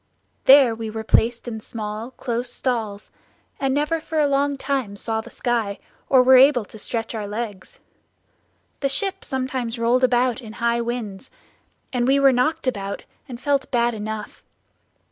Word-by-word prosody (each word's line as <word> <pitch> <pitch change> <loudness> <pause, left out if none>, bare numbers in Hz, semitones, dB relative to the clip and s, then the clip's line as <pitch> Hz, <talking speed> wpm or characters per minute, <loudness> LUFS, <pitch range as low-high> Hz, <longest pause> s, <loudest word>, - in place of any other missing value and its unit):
There 265 -3 +7
we 225 0 -5
were 220 0 -5
placed 235 +2 +2
in 220 -2 -5
small 215 +1 -6
close 245 -1 -3
stalls, 220 -5 -3 0.5
and 270 -3 0
never 300 +4 0
for 320 - -5
a 300 - +4
long 280 0 +1
time 265 -7 -2
saw 220 +2 -2
the - - -12
sky, 230 -5 -1 0.3
or 260 -2 +6
were 260 +1 +7
able 260 -3 +5
to 220 - -11
stretch 225 +1 -3
our 215 -2 -4
legs. 205 -2 -6 1.0
The 275 - 0
ship 385 +7 -1
sometimes 255 -2 -3
rolled 235 +2 +2
about 250 0 +2
in 220 -2 -10
high 235 0 0
winds, 235 -2 -5 0.6
and 245 -1 +1
we 275 +1 +4
were 275 -1 +5
knocked 310 +6 +1
about, 200 -5 -3 0.3
and 240 -2 -7
felt 280 +1 0
bad 240 -1 +1
enough. 215 0 -6
240 Hz, 165 wpm, -22 LUFS, 220-265 Hz, 1.0 s, There